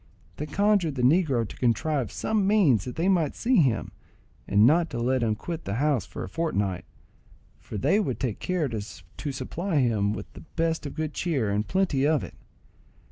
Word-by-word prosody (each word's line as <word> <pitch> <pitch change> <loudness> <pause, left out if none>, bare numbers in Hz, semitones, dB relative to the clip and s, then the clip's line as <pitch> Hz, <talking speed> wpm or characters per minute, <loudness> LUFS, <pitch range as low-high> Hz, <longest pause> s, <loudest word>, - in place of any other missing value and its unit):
They 150 - -4
conjured 200 -3 +2
the 125 - -2
negro 135 - +3
to - - -10
contrive 130 +1 0
some 210 -3 0
means 170 - +4
that 125 - -6
they 170 +3 0
might 170 -7 +2
see 255 +2 +2
him, 130 - +2 0.6
and 105 +2 +5
not 165 +5 +4
to 120 - -5
let 125 +2 +1
him 110 -2 +1
quit 165 +8 -6
the 100 - -2
house 135 - +1
for - - -6
a - - -5
fortnight, 100 - -2 0.7
for - - -7
they 155 - +2
would 135 - -2
take 120 -6 -2
care 180 -5 -1
to 115 -4 -4 0.5
supply 170 +7 -4
him 110 -7 +2
with - - -7
the - - -11
best 165 -2 0
of 140 - -8
good 155 -1 -3
cheer, 135 - -1
and 105 +1 -1
plenty 175 -8 +1
of 155 -4 +2
it. - - -8
145 Hz, 190 wpm, -26 LUFS, 115-170 Hz, 0.7 s, and